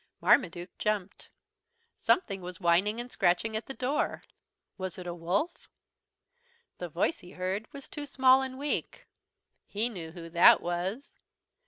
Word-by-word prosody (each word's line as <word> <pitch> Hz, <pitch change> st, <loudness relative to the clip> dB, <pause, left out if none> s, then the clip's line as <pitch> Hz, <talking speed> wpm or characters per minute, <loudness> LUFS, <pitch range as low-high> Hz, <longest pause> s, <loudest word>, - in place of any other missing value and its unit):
Marmaduke 175 Hz, -6 st, +2 dB
jumped. 205 Hz, -2 st, -2 dB, 0.7 s
Something 200 Hz, -, +1 dB
was 180 Hz, -1 st, -7 dB
whining 190 Hz, +6 st, +2 dB
and 240 Hz, +1 st, -6 dB
scratching 195 Hz, +5 st, +1 dB
at 220 Hz, 0 st, -3 dB
the 270 Hz, -, -6 dB
door. 265 Hz, +4 st, -1 dB, 0.5 s
Was 185 Hz, -2 st, -5 dB
it 180 Hz, -, -8 dB
a 175 Hz, -, -4 dB
wolf? 180 Hz, -, -2 dB, 1.1 s
The 175 Hz, -, -4 dB
voice 165 Hz, +2 st, 0 dB
he 175 Hz, -, -13 dB
heard 190 Hz, +4 st, -4 dB
was 280 Hz, -1 st, -8 dB
too 295 Hz, -1 st, -7 dB
small 260 Hz, -1 st, +5 dB
and 260 Hz, -1 st, -5 dB
weak. 285 Hz, +2 st, -2 dB, 0.6 s
He 220 Hz, +4 st, -1 dB
knew 175 Hz, -8 st, -7 dB
who 170 Hz, -1 st, -9 dB
that 170 Hz, +1 st, +7 dB
was. 180 Hz, +9 st, -4 dB
195 Hz, 145 wpm, -29 LUFS, 175-255 Hz, 1.1 s, that